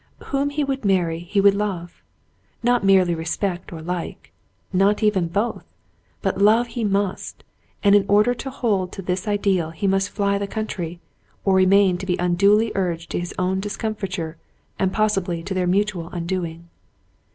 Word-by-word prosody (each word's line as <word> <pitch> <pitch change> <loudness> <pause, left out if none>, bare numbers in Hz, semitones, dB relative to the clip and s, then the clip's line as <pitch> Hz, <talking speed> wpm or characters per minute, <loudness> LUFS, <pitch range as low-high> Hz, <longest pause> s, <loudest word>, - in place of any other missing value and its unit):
Whom 275 +1 +1
he 290 +1 -1
would, 270 -2 -2
marry 175 -5 +1
he 175 +4 -1
would 200 0 +6
love. 195 -4 -4 0.6
Not 245 -2 +2
merely 190 -3 +4
respect 175 +3 -3
or 160 -2 -7
like, 175 0 -5 0.2
— - - -37
not 200 +4 +3
even 195 -5 +2
both, 205 +7 -2 0.3
— - - -40
but - - -1
love 225 +4 +4
he 235 -1 -4
must; 200 -2 -2 0.4
and 200 -1 +5
in 205 -1 +5
order 210 +4 +4
to 270 +2 -6
hold 205 -8 -1
to 195 - -7
this 185 +3 -2
ideal 195 -5 +1
he 165 +5 -5
must 195 +1 +2
fly 200 -1 0
the 200 - -3
country, 180 -6 -4 0.5
or 195 - +3
remain 190 -1 +4
to 190 - -6
be 180 - +1
unduly 200 +5 +3
urged 175 -3 -2
to - - -1
his 175 0 -5
own 185 +1 0
discomfiture 195 -5 -4 0.4
and 190 -1 +1
possibly 195 -5 0
to 190 +2 -4
their 185 -1 0
mutual 190 -3 0
undoing. 170 -1 -4
195 Hz, 175 wpm, -22 LUFS, 175-210 Hz, 0.6 s, would